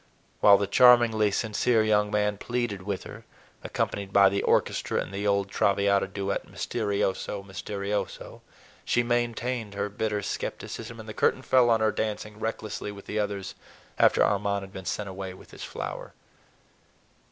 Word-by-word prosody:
While 100 Hz, -1 st, +7 dB
the 100 Hz, -, 0 dB
charmingly 115 Hz, 0 st, +5 dB
sincere 110 Hz, +2 st, +1 dB
young 105 Hz, -1 st, +2 dB
man 105 Hz, -1 st, 0 dB
pleaded 120 Hz, -5 st, -2 dB
with 100 Hz, 0 st, -4 dB
her—accompanied 100 Hz, -1 st, -6 dB
by 100 Hz, -1 st, +6 dB
the 100 Hz, +1 st, -1 dB
orchestra -, -, +1 dB
in -, -, -4 dB
the 100 Hz, +1 st, -2 dB
old 100 Hz, -1 st, +1 dB
"Traviata" 100 Hz, 0 st, +2 dB
duet, 100 Hz, 0 st, -3 dB
"misterioso, 100 Hz, -2 st, -2 dB
misterioso!"—she 100 Hz, +4 st, -4 dB
maintained 120 Hz, -2 st, -1 dB
her 100 Hz, +1 st, -2 dB
bitter 105 Hz, 0 st, -2 dB
skepticism, 115 Hz, +3 st, -5 dB
and 110 Hz, -, -9 dB
the 110 Hz, -, -6 dB
curtain 130 Hz, -, +1 dB
fell 125 Hz, -2 st, +4 dB
on 115 Hz, -1 st, +3 dB
her 110 Hz, 0 st, +3 dB
dancing 105 Hz, 0 st, -4 dB
recklessly 110 Hz, -2 st, -4 dB
with 100 Hz, -1 st, -11 dB
the 105 Hz, -, -3 dB
others, 100 Hz, -2 st, -3 dB, 0.5 s
after -, -, +5 dB
Armand 100 Hz, -1 st, 0 dB
had 95 Hz, -, -11 dB
been 95 Hz, -, -8 dB
sent 100 Hz, +3 st, -3 dB
away 95 Hz, -1 st, -6 dB
with -, -, -16 dB
his -, -, -9 dB
flower. -, -, -6 dB
105 Hz, 150 wpm, -27 LUFS, 100-110 Hz, 0.5 s, While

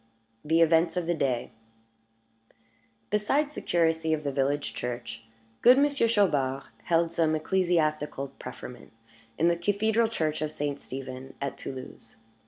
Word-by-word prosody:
THE 160 Hz, +2 st, +3 dB
EVENTS 165 Hz, +1 st, +4 dB
OF 180 Hz, -, 0 dB
THE 175 Hz, -, +1 dB
DAY 130 Hz, -6 st, -1 dB, 1.6 s
Besides 275 Hz, +9 st, +1 dB
the -, -, -6 dB
curacy 160 Hz, -1 st, +1 dB
of 155 Hz, -1 st, -2 dB
the 140 Hz, -, -1 dB
village 140 Hz, +1 st, 0 dB
church, 120 Hz, -1 st, -5 dB, 0.4 s
good 250 Hz, +2 st, +7 dB
Monsieur 280 Hz, -3 st, +3 dB
Chaubard 145 Hz, -, +2 dB, 0.2 s
held 170 Hz, -1 st, +2 dB
some 160 Hz, -2 st, +2 dB
ecclesiastical 155 Hz, -5 st, 0 dB
preferment 120 Hz, -2 st, -9 dB, 0.4 s
in 165 Hz, -, +3 dB
the 170 Hz, -, +3 dB
cathedral 210 Hz, +6 st, +1 dB
church 155 Hz, -9 st, -2 dB
of 155 Hz, -1 st, -1 dB
St. 145 Hz, -2 st, -3 dB
Stephen 130 Hz, 0 st, -8 dB
at 140 Hz, -1 st, -3 dB
Toulouse. 130 Hz, -3 st, -8 dB
160 Hz, 135 wpm, -28 LUFS, 140-180 Hz, 1.6 s, good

